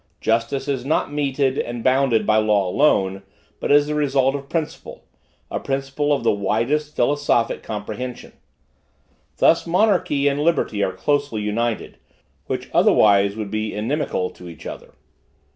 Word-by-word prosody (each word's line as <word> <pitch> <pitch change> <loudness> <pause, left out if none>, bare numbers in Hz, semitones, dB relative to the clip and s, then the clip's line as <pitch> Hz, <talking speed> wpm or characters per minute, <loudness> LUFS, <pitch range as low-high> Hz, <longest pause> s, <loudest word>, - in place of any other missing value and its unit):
Justice 115 +5 0
is 135 -3 -2
not 145 +1 -1
meted 140 -2 0
and 120 -1 -4
bounded 130 -3 +2
by 110 - +3
law 105 -3 +2
alone, 95 -4 +2 0.4
but - - -2
is 145 0 +6
the 150 - -3
result 135 -3 +1
of 140 -1 -6
principle, 160 -3 -5 0.5
a - - -2
principle 135 +2 -2
of 140 -4 +1
the 115 - +3
widest 115 +9 -1
philosophic 135 -2 +1
comprehension. 110 +3 -6 1.0
Thus, 165 - +3
monarchy 175 -6 +2
and 140 0 +1
liberty 150 -9 0
are - - 0
closely 145 -6 -1
united, 115 +2 -2 0.5
which - - -4
otherwise 100 -1 +4
would 105 -2 -5
be 110 0 -3
inimical 110 -4 -2
to 90 - -12
each 85 - -12
other. - - -9
130 Hz, 145 wpm, -21 LUFS, 110-145 Hz, 1.0 s, is